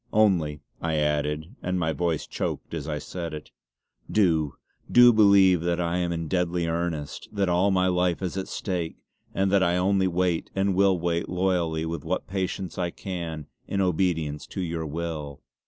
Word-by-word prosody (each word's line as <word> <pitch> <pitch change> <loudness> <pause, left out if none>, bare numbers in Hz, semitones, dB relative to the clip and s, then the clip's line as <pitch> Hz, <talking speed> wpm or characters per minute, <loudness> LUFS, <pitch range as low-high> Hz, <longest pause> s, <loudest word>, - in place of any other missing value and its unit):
Only" 85 -9 +2 0.2
I 80 -1 0
added 75 - -1
and 90 +1 -1
my 80 -2 0
voice 85 -3 -1
choked - - -4
as - - -4
I - - -2
said 85 -3 -5
it 75 - -10 0.6
"Do, 80 -9 +2 0.4
do 120 0 +8
believe 100 -4 +6
that 85 0 0
I 85 0 0
am 90 -1 0
in 85 -1 -3
deadly 90 -1 0
earnest; 80 -3 -3
that 100 -3 0
all 90 +3 +3
my 95 -1 +2
life 90 0 +1
is 90 - -2
at 95 -1 -3
stake; 90 -5 -3 0.4
and 95 0 +1
that 100 -1 +4
I 90 -1 +2
only 95 +1 +2
wait, 90 -1 0
and 95 +1 +2
I - - +1
will 95 -1 +3
wait 85 0 -1
loyally 90 -3 0
with 80 -3 -4
what 90 +3 -2
patience 95 -1 -3
I 90 -1 0
can, 85 -5 -5 0.2
in 100 - -2
obedience 80 -5 0
to 95 - -5
your 85 -2 -3
will. 75 -2 -5
85 Hz, 180 wpm, -26 LUFS, 80-95 Hz, 0.6 s, do